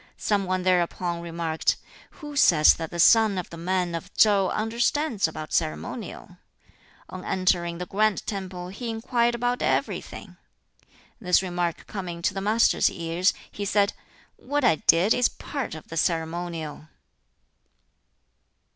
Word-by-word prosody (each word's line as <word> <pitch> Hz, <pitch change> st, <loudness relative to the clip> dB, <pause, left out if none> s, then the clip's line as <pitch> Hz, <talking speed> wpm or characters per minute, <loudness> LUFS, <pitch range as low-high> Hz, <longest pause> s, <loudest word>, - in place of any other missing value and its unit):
Some 205 Hz, -2 st, 0 dB
one 185 Hz, 0 st, -1 dB
thereupon 175 Hz, -1 st, 0 dB
remarked, 165 Hz, -1 st, -1 dB, 0.3 s
"Who 295 Hz, -2 st, -10 dB
says 155 Hz, -, +6 dB
that 165 Hz, -1 st, -6 dB
the 170 Hz, -, -7 dB
son 220 Hz, +2 st, +5 dB
of 180 Hz, -, -5 dB
the -, -, -7 dB
man 180 Hz, 0 st, -1 dB
of 165 Hz, -, -6 dB
Tsou 200 Hz, -3 st, +4 dB
understands 235 Hz, -, 0 dB
about 155 Hz, -1 st, -7 dB
ceremonial? 75 Hz, +1 st, -3 dB, 0.7 s
On 185 Hz, 0 st, -8 dB
entering 180 Hz, -2 st, 0 dB
the 180 Hz, -, -5 dB
grand 215 Hz, +2 st, 0 dB
temple 185 Hz, -3 st, -5 dB
he 230 Hz, +5 st, -6 dB
inquired 235 Hz, +1 st, 0 dB
about 245 Hz, +1 st, -1 dB
everything." -, -, -2 dB, 0.8 s
This 180 Hz, -3 st, +2 dB
remark 175 Hz, -2 st, -2 dB
coming 175 Hz, -4 st, -6 dB
to 185 Hz, -, +1 dB
the 195 Hz, -, -4 dB
Master's 215 Hz, +3 st, +3 dB
ears, 170 Hz, +2 st, 0 dB, 0.2 s
he 205 Hz, -, -5 dB
said, 200 Hz, 0 st, +2 dB, 0.4 s
"What 290 Hz, +2 st, -2 dB
I 160 Hz, -, +4 dB
did 175 Hz, +9 st, +4 dB
is 250 Hz, -, +3 dB
part 275 Hz, -, -5 dB
of 155 Hz, -, -11 dB
the 165 Hz, -, -6 dB
ceremonial!" 165 Hz, -2 st, -2 dB
185 Hz, 140 wpm, -25 LUFS, 170-215 Hz, 0.8 s, says